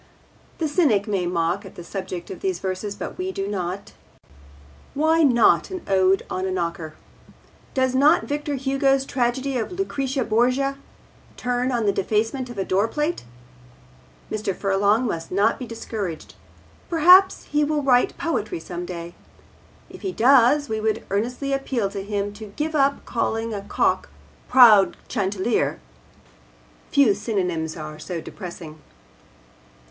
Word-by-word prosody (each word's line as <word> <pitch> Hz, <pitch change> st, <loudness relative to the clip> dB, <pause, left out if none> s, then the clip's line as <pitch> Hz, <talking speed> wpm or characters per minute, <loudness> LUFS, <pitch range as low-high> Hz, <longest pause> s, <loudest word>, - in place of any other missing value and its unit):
The 320 Hz, -, -1 dB
cynic 285 Hz, -, +2 dB
may 195 Hz, -4 st, -1 dB
mock 175 Hz, +3 st, 0 dB
at 195 Hz, -, -12 dB
the 175 Hz, -, -9 dB
subject 185 Hz, -1 st, -6 dB
of 185 Hz, -, -7 dB
these 190 Hz, -2 st, -1 dB
verses, 190 Hz, +3 st, -4 dB
but -, -, -7 dB
we 370 Hz, +1 st, -2 dB
do 195 Hz, -, -4 dB
not. 190 Hz, -1 st, -4 dB, 1.0 s
Why 320 Hz, +3 st, +3 dB
not 245 Hz, -6 st, +4 dB
an 370 Hz, -2 st, -6 dB
ode 190 Hz, 0 st, +3 dB
on 185 Hz, -, -3 dB
a -, -, -2 dB
knocker? 170 Hz, -3 st, -3 dB, 0.8 s
Does 260 Hz, -1 st, +1 dB
not 285 Hz, +5 st, +4 dB
Victor 290 Hz, 0 st, -3 dB
Hugo's 270 Hz, 0 st, +1 dB
tragedy 255 Hz, +1 st, -1 dB
of 225 Hz, -, -4 dB
Lucrece 275 Hz, -8 st, -2 dB
Borgia 255 Hz, +5 st, +1 dB, 0.6 s
turn 245 Hz, +1 st, -1 dB
on 235 Hz, -3 st, 0 dB
the 200 Hz, -, +4 dB
defacement 225 Hz, +7 st, -1 dB
of 240 Hz, -, -9 dB
a 195 Hz, -, -1 dB
doorplate? 265 Hz, -, -1 dB, 1.1 s
Mr. 210 Hz, -3 st, -2 dB
Furlong 200 Hz, +4 st, +2 dB
must 165 Hz, -7 st, -4 dB
not 205 Hz, +4 st, +2 dB
be 250 Hz, -, -6 dB
discouraged. 215 Hz, -7 st, -6 dB, 0.6 s
Perhaps 360 Hz, +4 st, +6 dB
he 295 Hz, 0 st, +2 dB
will 295 Hz, 0 st, 0 dB
write 250 Hz, -2 st, +3 dB
poetry 215 Hz, -, -2 dB
some 175 Hz, +1 st, -6 dB
day. 170 Hz, -1 st, -7 dB, 0.7 s
If -, -, -13 dB
he 380 Hz, -, -3 dB
does 275 Hz, +2 st, +4 dB
we 220 Hz, 0 st, -2 dB
would 220 Hz, 0 st, -1 dB
earnestly 250 Hz, +7 st, -1 dB
appeal 255 Hz, -7 st, -1 dB
to 200 Hz, -1 st, -5 dB
him 205 Hz, 0 st, -3 dB
to 215 Hz, +1 st, -9 dB
give 315 Hz, +1 st, -2 dB
up 280 Hz, -2 st, +1 dB
calling 225 Hz, -1 st, -2 dB
a 200 Hz, -, -4 dB
cock 200 Hz, -, 0 dB, 0.4 s
'proud 215 Hz, -8 st, +7 dB
chanticleer.' 200 Hz, -, -1 dB, 1.1 s
Few 275 Hz, -7 st, +4 dB
synonyms 180 Hz, -6 st, -2 dB
are 155 Hz, -1 st, -7 dB
so 170 Hz, +2 st, -5 dB
depressing. 165 Hz, -3 st, -9 dB
220 Hz, 140 wpm, -23 LUFS, 190-275 Hz, 1.1 s, proud